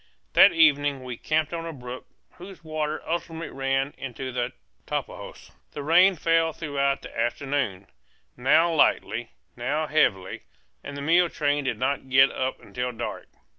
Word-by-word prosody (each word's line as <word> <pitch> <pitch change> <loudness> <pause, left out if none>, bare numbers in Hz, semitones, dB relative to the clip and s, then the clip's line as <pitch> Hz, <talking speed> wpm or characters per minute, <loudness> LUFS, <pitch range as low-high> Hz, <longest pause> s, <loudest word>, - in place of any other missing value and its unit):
That - - +8
evening 145 -4 +3
we 125 -1 -6
camped 155 +5 -1
on 165 0 -4
a - - -4
brook 125 -3 -9 0.3
whose 180 -1 -11
waters 155 -1 -3
ultimately 165 0 -3
ran 135 +1 0
into 130 0 -5
the 120 -1 -2 0.4
Tapajos. - - -6 0.2
The 145 - -5
rain 180 +5 +5
fell 165 0 +2
throughout 140 -3 -1
the - - -10
afternoon, 120 -4 -1 0.5
now 160 +7 +3
lightly, 155 - +1 0.3
now 140 +6 -1
heavily, 95 -12 +1 0.4
and 140 - -7
the 140 - -5
mule 170 +3 +4
train 145 -2 0
did 130 - -1
not 135 +1 -2
get 135 +1 +6
up 130 0 -3
until 125 0 -4
dark. 120 0 -6
145 Hz, 150 wpm, -25 LUFS, 130-160 Hz, 0.5 s, That